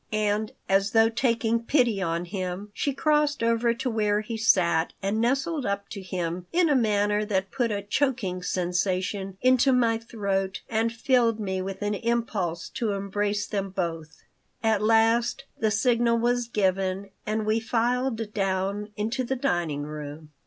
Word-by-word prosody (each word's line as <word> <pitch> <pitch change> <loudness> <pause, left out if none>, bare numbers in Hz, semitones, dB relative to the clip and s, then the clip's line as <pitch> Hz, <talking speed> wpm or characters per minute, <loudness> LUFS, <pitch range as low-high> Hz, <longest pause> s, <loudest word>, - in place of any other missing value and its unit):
And, 215 0 0 0.2
as 195 +1 +2
though 225 0 +5
taking 230 -1 +1
pity 235 -5 +2
on 170 -1 -1
him, 185 +2 -5
she 280 - -1
crossed 295 -1 +1
over 230 +1 +2
to 250 - -3
where 210 -3 +1
he 225 +2 -5
sat 175 -7 +3
and 200 +3 -1
nestled 270 +5 0
up 200 -2 -2
to 200 - -6
him 175 -1 -4
in 345 -1 +3
a 290 - +4
manner 210 -3 +2
that 195 -2 -1
put 245 -4 0
a 200 -1 -2
choking 210 -5 -1
sensation 185 +2 -1
into 255 +1 +5
my 230 -3 +3
throat 200 -4 -2
and 225 +1 0
filled 230 -1 +2
me 190 -3 -2
with 195 +2 -5
an 205 0 0
impulse 205 -6 -1
to 220 -4 -2
embrace 205 +1 -1
them 195 -2 -3
both 165 -4 -4 0.4
At 220 -2 +2
last 225 +4 +3 0.2
the 220 - +2
signal 235 +1 +2
was 240 +1 +1
given 195 -2 0 0.2
and 215 0 -1
we 215 +1 +2
filed 230 -1 -1
down 195 +1 -1
into 225 +5 -1
the 265 +2 -1
dining 175 - -1
room. 150 +1 -8
210 Hz, 160 wpm, -26 LUFS, 190-235 Hz, 0.4 s, though